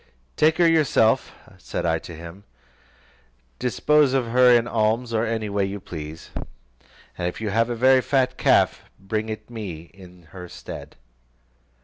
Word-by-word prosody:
"Take 155 +1 +3
her 175 - +5
yourself," 150 -9 +3 0.3
said - - -4
I - - +1
to 85 - -10
him, 85 +4 -11 1.2
"dispose 140 +3 +2
of 130 -4 0
her 125 +1 +6
in 120 -1 +4
alms, 115 +1 0
or 110 +1 +1
any 110 -1 -2
way 100 -1 0
you 100 +1 -3
please: 80 -3 -9 0.9
and 90 - -1
if 90 - -5
you 110 -2 -3
have 115 +3 +1
a 120 - -2
very 130 +2 +5
fat 130 -1 +1
calf, - - +3 0.2
bring 110 +3 -3
it 110 +1 -7
me 90 -8 -7
in 90 -2 -15
her 90 -2 -9
stead." - - -9
110 Hz, 155 wpm, -23 LUFS, 95-125 Hz, 1.2 s, her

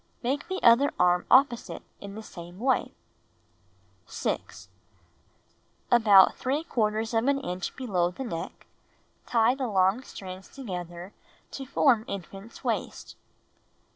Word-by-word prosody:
Make 275 +4 -1
the 375 0 -3
other 240 +5 +6
arm 180 0 +3
opposite 255 -2 +3 0.2
in 200 0 -9
the 220 - -8
same 175 -3 -11
way. 260 +5 0 1.1
6. - - -4 1.2
About 210 -6 +7
f - - -16
of 225 -6 -1
an 270 +5 +2
inch 180 -5 -4
below 190 -9 0
the 180 +9 -7
neck, 165 -10 -6 0.6
tie 230 0 +3
the 265 -1 -3
long 195 +2 +2
strands 190 -6 -9
together 180 -6 -7 0.4
to 270 -1 -7
form 255 -4 +3
infant's 195 +3 -8
waist. - - -3
220 Hz, 115 wpm, -27 LUFS, 185-255 Hz, 1.2 s, About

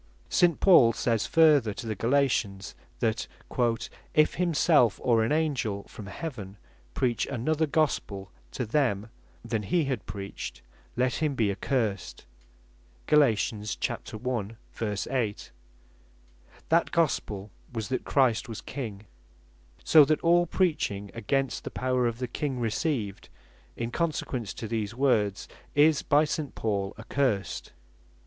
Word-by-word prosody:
St. 175 -3 +3
Paul 135 -12 +6
says 115 -1 0
further 150 -10 +4
to - - -7
the 110 - -2
Galatians, 115 -6 0 0.3
that 115 -2 0 0.9
"if 155 0 +4
himself, 160 - +3
or 115 -3 +3
an 110 - 0
Angell 135 -10 0
from 105 - -11
heaven 105 - -7 0.4
preach 120 -3 0
another 155 +5 0
Gospel 105 - -1 0.2
to 125 - -2
them, 110 -4 0 0.3
than 115 -2 -1
he 150 - +1
had 130 -9 -3
preached, 100 0 -7 0.3
let 125 +3 0
him 150 -3 +1
be 110 -5 +2
accursed." 105 -2 -2 0.8
(Gal. 150 - +5
1. 110 -1 -2 0.5
8) 115 -6 -2 1.2
That 165 +1 +3
Gospel 110 -11 -1 0.2
was, 115 -2 -4
that 130 - -1
Christ 130 -2 +2
was 110 - -6
King; 110 -7 -6 0.8
so 155 -2 +8
that 155 +2 +1
all 175 +1 +4
preaching 125 - 0
against 135 +3 -1
the - - -5
power 125 -1 0
of 115 -1 -3
the 125 0 -3
King 130 +2 -3
received, 115 - -2 0.5
in 120 0 -3
consequence 130 - -2
to 115 - -5
these 110 -1 -3
words, 110 -7 +1 0.3
is 150 +1 +5
by 150 +1 +3
St. 150 -2 -4
Paul 100 -3 -2
accursed. 110 -2 -1
120 Hz, 125 wpm, -28 LUFS, 105-145 Hz, 1.2 s, so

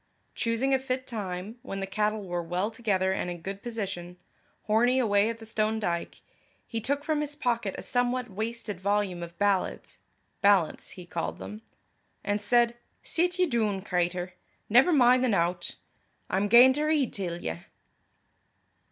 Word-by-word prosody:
Choosing 245 +3 0
a 265 - +4
fit 260 0 -3
time, 205 -1 -5
when 195 -6 -5
the 195 - -2
cattle 210 +2 -1
were 175 -2 -2
well 180 +5 -2
together 200 -5 0
and 185 - -2
in 175 -1 -6
good 195 +1 -5
position, 185 -7 -5 0.5
Hornie 240 +4 +3
away 205 -3 +3
at 230 - -4
the 225 - -11
stone 220 0 0
dyke, 170 -5 -3 0.4
he 225 -1 -4
took 285 +5 -1
from 300 0 0
his 295 -1 -3
pocket 235 -8 -1
a - - -6
somewhat 245 0 0
wasted 220 -1 -4
volume 200 -3 0
of 170 0 -8
ballads 200 -1 0 0.4
ballants, 200 -5 +3
he 180 - -9
called 170 -1 -3
them 210 +1 -8 0.6
and 205 0 0
said, 235 +2 +3 0.3
"Sit 355 +2 0
ye 365 - +4
doon, 215 - 0
cratur. 180 -1 -1 0.4
Never 245 +10 +6
min' 250 -4 +5
the 255 - +2
nowt. 175 -3 0 0.6
I'm 195 +2 +1
gaein' 245 +4 +8
to 300 +3 -1
read 305 -5 +1
till 175 -4 -3
ye." 80 - -4
215 Hz, 160 wpm, -28 LUFS, 190-245 Hz, 0.6 s, gaein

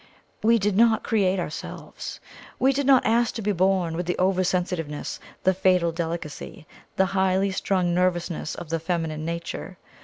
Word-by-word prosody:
We 230 +2 +5
did 205 -2 0
not 225 +1 +4
create 195 -4 +1
ourselves. 155 -3 -6 0.4
We 265 +2 +3
did 280 0 -1
not 265 -2 +6
ask 235 +1 +2
to 225 - -3
be 210 - +1
born 185 -3 +1
with 175 +1 -3
the 180 - -1
over 185 0 +2
sensitiveness, 175 -5 -2 0.2
the 190 - +4
fatal 180 -2 +3
delicacy, 165 -2 -5 0.3
the 190 - +3
highly 190 0 +2
strung 185 -2 0
nervousness 175 -2 0
of 165 - -8
the 165 0 0
feminine 160 -2 -2
nature. 170 +2 -5
185 Hz, 160 wpm, -25 LUFS, 170-195 Hz, 0.4 s, not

